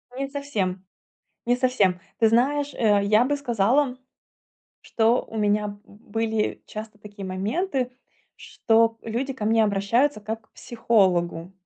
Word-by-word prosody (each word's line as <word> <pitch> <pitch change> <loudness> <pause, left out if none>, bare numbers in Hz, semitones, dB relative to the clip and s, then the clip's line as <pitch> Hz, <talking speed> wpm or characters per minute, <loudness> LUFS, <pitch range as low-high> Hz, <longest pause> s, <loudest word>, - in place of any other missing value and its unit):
Не 275 +1 -3
совсем 210 -11 -3 0.6
не 245 - +4
совсем. 245 -8 +1 0.2
Ты 225 -2 +5
знаешь, 280 +5 +2
э, 205 -3 +3
я 215 +4 +4
бы 290 +2 0
сказала, 250 +1 +1 0.9
что 230 +2 +2
у 225 - -10
меня 210 -1 0
были 220 +1 -3
часто 215 0 -8
такие 205 -1 -10
моменты, 250 - -2 0.5
что 225 0 +1
люди 245 +5 -3
ко 255 -5 -6
мне 225 0 +4
обращаются, 215 +6 +1
как 220 +2 -5
к - - -52
психологу. 185 -7 0
225 Hz, 130 wpm, -24 LUFS, 205-250 Hz, 0.9 s, Ты